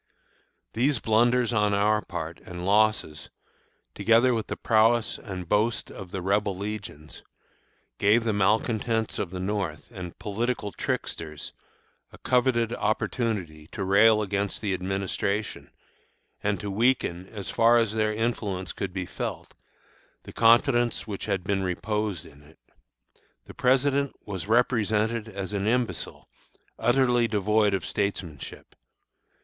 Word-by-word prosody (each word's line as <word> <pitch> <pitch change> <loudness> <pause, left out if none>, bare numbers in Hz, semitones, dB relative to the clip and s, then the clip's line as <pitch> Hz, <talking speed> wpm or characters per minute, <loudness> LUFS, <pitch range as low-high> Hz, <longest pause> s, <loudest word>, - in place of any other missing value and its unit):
These 130 +4 +2
blunders 120 +2 +2
on 105 -2 +2
our 105 +1 +2
part 85 -3 -6
and 90 0 -7
losses, 105 -7 +1 0.6
together 115 +2 +4
with 110 -2 -2
the - - -4
prowess 115 +1 +2
and 90 -4 -7
boast 105 +3 +1
of 95 -3 -9
the 95 0 -5
Rebel 100 0 +1
legions, 100 -7 -7 0.8
gave 110 +3 +4
the 110 -2 0
malcontents 110 +2 +1
of 95 - -2
the 90 +1 -6
North, 95 -4 -3
and 90 -6 -8
political 105 0 -2
tricksters, 75 -5 -4 0.6
a - - -13
coveted 125 -2 +1
opportunity 105 -8 -2
to 100 - -3
rail 105 +3 +5
against 100 0 -2
the 100 -3 -1
Administration, 95 +2 -2 0.7
and 100 -1 0
to 105 -1 -4
weaken, 100 -5 +1
as 100 -3 -6
far 115 +1 +5
as 115 -3 +1
their 110 -1 +1
influence 105 -5 -2
could 95 -2 -4
be 95 -1 -3
felt, - - -6 0.7
the - - -11
confidence 120 +1 +3
which 100 -3 -5
had 100 -3 -1
been 95 +1 0
reposed 100 0 -2
in 70 - -16
it. 75 +2 -20 0.9
The - - -11
President 140 +1 +2
was 95 -3 -5
represented 110 -1 +1
as 100 -1 -5
an 100 0 -1
imbecile, 120 +1 -2 0.5
utterly 120 -1 +3
devoid 105 -1 +2
of 95 - -4
statesmanship. 95 -8 -4
105 Hz, 130 wpm, -26 LUFS, 95-115 Hz, 0.9 s, rail